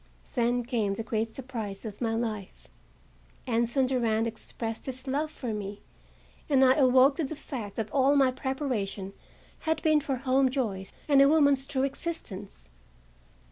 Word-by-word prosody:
Then 245 -1 +1
came 225 -5 -1
the 225 - -4
great 220 0 -2
surprise 230 -6 -5
of 210 0 -7
my 225 -1 0
life. 215 - -4 0.8
Anson 235 +3 +2
Durand 230 -4 +1
expressed 225 0 -5
his 260 0 -5
love 285 +3 -1
for 245 -7 -4
me 205 -1 -6 0.7
and 265 -2 +5
I 260 - +6
awoke 265 0 +5
to 330 - 0
the 300 +3 -4
fact 235 -9 -7
that 220 -2 -3
all 275 +1 +4
my 270 -2 +4
preparation 250 -8 -3 0.5
had 320 0 0
been 310 -1 +4
for 280 -2 -1
home 260 +1 +2
joys 210 -8 -2 0.2
and 280 -2 +6
a 275 - +7
woman's 285 -3 +4
true 270 -2 0
existence. 270 - -5
255 Hz, 155 wpm, -28 LUFS, 220-275 Hz, 0.8 s, a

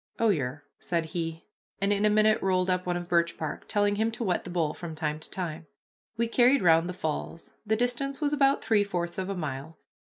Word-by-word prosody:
"Oh, 230 -1 +3
yer," 145 -5 -1 0.2
said 170 -2 -1
he, 165 -1 -4 0.3
and 200 +1 +2
in 205 +1 +1
a - - +5
minute 215 +1 +4
rolled 185 -1 +2
up 180 0 -1
one 175 0 0
of 175 0 -6
birch 170 -1 +2
bark, 155 -2 -5
telling 205 0 +1
him 220 +1 +2
to 235 - -3
wet 185 -5 0
the - - -6
bowl 165 -4 0
from 170 -3 -7
time 155 -1 -2
to - - -6
time. 165 -3 -5 0.5
We 235 0 +1
carried 250 +2 +4
round 165 0 +5
the - - -3
falls. 165 -1 -4 0.2
The 220 - +3
distance 245 +4 -1
was 295 -1 0
about 275 -1 +3
three 215 -2 +3
fourths 175 -3 -3
of 190 0 -3
a 195 - -2
mile. 150 0 -5
180 Hz, 225 wpm, -28 LUFS, 165-215 Hz, 0.5 s, a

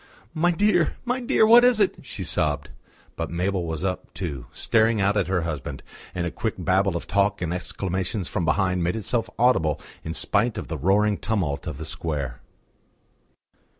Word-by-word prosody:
"My 170 +2 +2
dear, 180 -1 +2
my 250 +1 0
dear, 240 -3 +3
what 235 +2 +8
is 245 -3 +5
it?" 200 - +3
she 105 -6 -6
sobbed. 75 -4 -1 0.4
But 85 - -3
Mabel 90 0 -1
was 80 +1 -3
up, 95 -1 -3
too, 70 -10 -5
staring 110 -1 +2
out 100 +1 +2
at 100 -4 +1
her 90 -1 +1
husband; 75 -4 -5 0.3
and 90 -1 -1
a 85 - -2
quick 110 - -3
babble 95 0 +1
of - - -7
talk 100 +2 +1
and 85 -1 -2
exclamations 95 +2 -3
from 90 - -2
behind 90 +2 +1
made 85 +1 0
itself 115 +1 -1
audible 80 - +3 0.2
in 80 +1 -5
spite 110 +1 +1
of - - -6
the 80 - -3
roaring 100 +6 +2
tumult 90 -11 -2
of 75 -4 -4
the 80 - -6
square. 75 -6 -3
95 Hz, 180 wpm, -24 LUFS, 85-110 Hz, 0.4 s, what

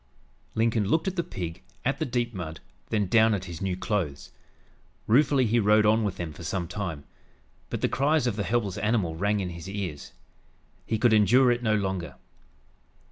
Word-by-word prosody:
Lincoln 115 -1 +2
looked 160 - +1
at 190 - -1
the 170 - 0
pig, 90 - -6 0.2
at 135 +2 0
the 155 - -1
deep 120 -1 -1
mud, 80 -4 -6 0.3
then 105 -2 +1
down 110 +3 +4
at 95 -2 -5
his 85 -3 -8
new 95 -2 -1
clothes. 95 -9 -3 0.7
Ruefully 135 +2 +4
he 115 +2 +2
rode 105 0 +4
on 110 +1 +4
with 100 -3 -2
them 85 -3 -5
for 85 - -10
some 85 +2 -2
time. 85 -7 -4 0.7
But - - -4
the - - +3
cries 145 +1 +1
of 120 -5 0
the 105 - -2
helpless 100 -1 -1
animal 105 -7 0
rang 100 +4 0
in 90 -2 -3
his 85 +2 -8
ears. 95 -8 -5 0.8
He 110 - 0
could 115 +1 +3
endure 120 +5 +5
it 120 0 0
no 110 -2 +2
longer. 95 -4 -2
105 Hz, 190 wpm, -27 LUFS, 90-120 Hz, 0.8 s, endure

